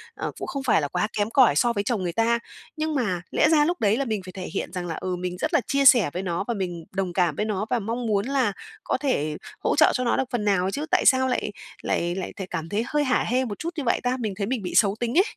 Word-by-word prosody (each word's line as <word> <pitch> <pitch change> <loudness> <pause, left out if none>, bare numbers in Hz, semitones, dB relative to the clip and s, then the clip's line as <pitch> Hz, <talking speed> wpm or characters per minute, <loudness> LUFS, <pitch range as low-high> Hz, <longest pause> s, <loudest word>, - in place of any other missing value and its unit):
ờ, - - -4
cũng - - -5
không 275 -1 -4
phải 220 -10 +3
là 145 - -1
quá 210 - -1
kém 205 +1 +1
cỏi 245 - +5
so 235 +8 +3
với 200 -1 -1
chồng 215 -5 -1
người 170 -1 -2
ta. 230 +2 +2 0.4
Nhưng 310 -1 -1
mà 190 -9 0
lẽ - - +3
ra 300 -2 +5
lúc 350 +2 -1
đấy 215 +2 +2
là 275 - -1
mình 215 -4 -2
phải 185 - -8
thể 190 - -7
hiện - - -3
rằng 180 -1 -4
là, 165 - -3
ừ, 185 -1 -3
mình 180 0 -4
rất - - -2
là - - +4
chia 275 0 +1
sẻ 235 - +7
với 185 +2 -3
nó 175 0 -2
và 235 - 0
mình 175 -5 -4
đồng 190 -2 -2
cảm 175 -5 +1
với 210 - -1
nó 210 -1 -2
và 245 -2 +1
mong 230 +3 -3
muốn 205 -1 +1
là 260 -7 +1 0.3
có - - 0
thể 155 - -1 0.2
hỗ - - 0
trợ 310 - +6
cho 255 - 0
nó 235 - +1
được 265 - +2
phần 225 -4 -1
nào 195 -1 +2
chứ, 295 +6 -3
tại - - +3
sao 260 -1 +5
lại 250 -4 -1 0.3
lại 175 +1 -1
lại 190 - -5
th - - -5
cảm 165 -2 -4
thấy 215 +3 0
hơi 295 0 +1
hả 255 -2 +2
hê 255 +3 +1
một 205 -3 -6
chút 330 - -3
như 290 - -2
vậy 235 - +1
ta? 250 +1 0
Mình 215 -4 -2
thấy 200 -1 -2
mình 250 -3 -1
bị 180 - -5
xấu 205 -2 +4
tính 240 +6 -1
ấy. 375 - +7
215 Hz, 300 wpm, -25 LUFS, 185-255 Hz, 0.4 s, sẻ